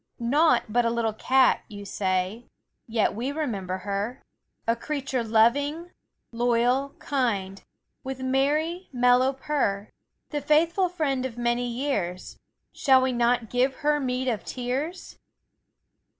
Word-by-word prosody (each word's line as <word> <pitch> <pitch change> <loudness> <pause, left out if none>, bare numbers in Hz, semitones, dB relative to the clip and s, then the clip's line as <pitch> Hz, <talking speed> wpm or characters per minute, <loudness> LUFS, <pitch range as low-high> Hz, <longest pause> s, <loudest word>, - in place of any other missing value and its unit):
Naught 290 +8 +3
but 240 +3 +2
a 230 - +2
little 230 -2 0
cat, 260 +4 +3
you 205 -2 -9
say; 190 +4 -2 0.4
Yet 225 -2 +1
we 240 +6 -3
remember 205 - -3
her, 205 +5 -3 0.4
A 230 - +3
creature 270 -1 -3
loving, 285 +10 +2 0.4
loyal, 245 +3 +1
kind, 205 -8 -2 0.4
With 265 -1 -5
merry, 295 +7 0
mellow 250 +1 +4
purr; 265 -8 -2 0.4
The 295 -1 -2
faithful 330 +6 +2
friend 290 -7 -1
of 250 -3 -5
many 240 0 0
years, 235 -9 -3 0.3
Shall 265 -1 +4
we 260 - +1
not 240 -1 +1
give 255 +2 +1
her 300 0 +3
meed 255 -1 -2
of 220 -8 -1
tears? 270 +8 -4
250 Hz, 125 wpm, -26 LUFS, 230-280 Hz, 0.4 s, mellow